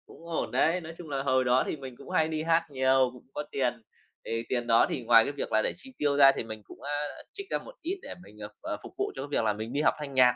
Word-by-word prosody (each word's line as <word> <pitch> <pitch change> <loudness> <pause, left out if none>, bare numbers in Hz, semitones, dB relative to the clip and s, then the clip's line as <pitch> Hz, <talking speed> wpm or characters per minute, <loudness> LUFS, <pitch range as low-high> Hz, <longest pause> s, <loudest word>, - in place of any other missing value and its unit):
Cũng 165 - -15
ổn 165 - -2
đấy, 175 +3 +2
nói 160 0 -8
chung 165 -3 -9
là 135 -1 -2
hồi 130 -1 +3
đó 125 +1 +4
thì - - -1
mình 135 -4 -9
cũng - - -12
hay 160 - +3
đi 155 -1 -2
hát 165 0 +3
nhiều, 130 -1 +3
cũng 125 - -14
có 150 - -3
tiền, 130 -3 +1 0.5
thì 115 0 -2
tiền 120 -2 -1
đó 115 - +6
thì 125 - -3
ngoài 115 -1 +7
cái 140 - -2
việc 145 - -5
là 110 0 +4
để - - 0
chi 265 +9 -14
tiêu 145 -1 +1
ra 135 -1 +9
thì 135 - -4
mình 110 -1 -7
cũng, - - -14
a, 145 - -4 0.4
trích 395 0 -7
ra - - +2
một - - -11
ít 365 +4 -3
để - - -7
mình, 105 - -16
ờ, 105 - -5
ờ, - - -3
phục - - -10
vụ - - -1
cho 135 - -4
cái 140 - -5
việc 130 - +1
là 105 - +3
mình 110 +3 -6
đi 145 - +1
học 155 - +4
thanh 145 -2 -6
nhạc. 125 -2 +6
135 Hz, 305 wpm, -29 LUFS, 120-155 Hz, 0.5 s, ra